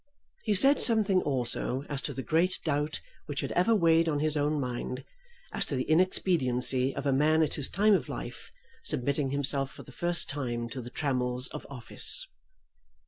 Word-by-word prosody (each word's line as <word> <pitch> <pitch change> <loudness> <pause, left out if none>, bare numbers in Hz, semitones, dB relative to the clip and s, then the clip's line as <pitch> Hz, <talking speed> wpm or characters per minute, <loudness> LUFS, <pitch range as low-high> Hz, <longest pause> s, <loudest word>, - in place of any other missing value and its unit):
He 210 - +1
said 275 +8 +6
something 210 -5 +3
also 130 0 -2
as 140 -2 -4
to - - -5
the 130 - -5
great 170 +5 +1
doubt 150 0 -2 0.3
which 145 -2 -3
had - - -4
ever 220 +6 +2
weighed 165 -3 +3
on 150 - 0
his 155 +1 0
own 150 +1 0
mind 125 0 -4 0.5
as - - -1
to 140 - -2
the 130 - -1
inexpediency 135 -7 +2
of 140 - -5
a 140 - +2
man 155 +4 +3
at 155 - -1
his 145 - -2
time 210 +1 +3
of 190 - 0
life - - -8 0.3
submitting 140 +2 0
himself 140 0 -2
for - - -12
the - - -14
first 175 0 +1
time 120 -4 -4
to 130 +2 -6
the 120 - -9
trammels 125 -2 0
of - - -9
office. 130 -4 0
145 Hz, 185 wpm, -28 LUFS, 130-165 Hz, 0.5 s, said